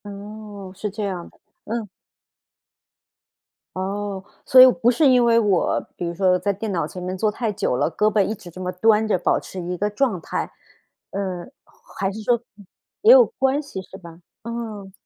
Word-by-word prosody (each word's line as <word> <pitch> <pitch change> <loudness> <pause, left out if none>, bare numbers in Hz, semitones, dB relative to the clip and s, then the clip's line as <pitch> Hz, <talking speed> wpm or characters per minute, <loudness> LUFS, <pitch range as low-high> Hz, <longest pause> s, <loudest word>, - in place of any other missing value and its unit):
哦， 205 -1 -9
是 210 +2 -4
这 210 +2 -5
样 185 -4 -4
的， - - -28 0.3
嗯。 225 0 -3 1.9
哦， 195 +1 -3 0.2
所 255 - +8
以 - - +12 0.2
不 240 - +5
是 280 +3 +4
因 250 -1 +5
为 230 -1 +4
我， 205 -5 +2 0.2
比 175 - -4
如 170 - -3
说 180 0 +3
在 195 +3 0
电 205 +2 -4
脑 170 -4 0
前 180 +4 -8
面 185 +1 -4
坐 210 +3 +1
太 225 +1 -2
久 190 -10 -1
了， - - +1
胳 210 +6 +2
膊 210 - +3
一 215 - -2
直 190 -4 -12
这 175 - -12
么 180 0 -3
端 215 +4 +3
着， 210 - +2
保 175 - +1
持 185 - -8
一 180 +1 -4
个 205 +3 0
状 210 -2 0
态。 - - -4 0.6
嗯， 185 -3 -4 0.5
还 195 0 0
是 215 +2 -7
说 240 +3 +3
呃， 235 - -8 0.6
也 435 +3 +7
有 - - +8
关 270 - 0
系 280 -10 -7
是 190 +1 -12
吧？ 170 -3 -13 0.2
嗯。 220 -4 -6
205 Hz, 205 characters per minute, -22 LUFS, 185-225 Hz, 1.9 s, 以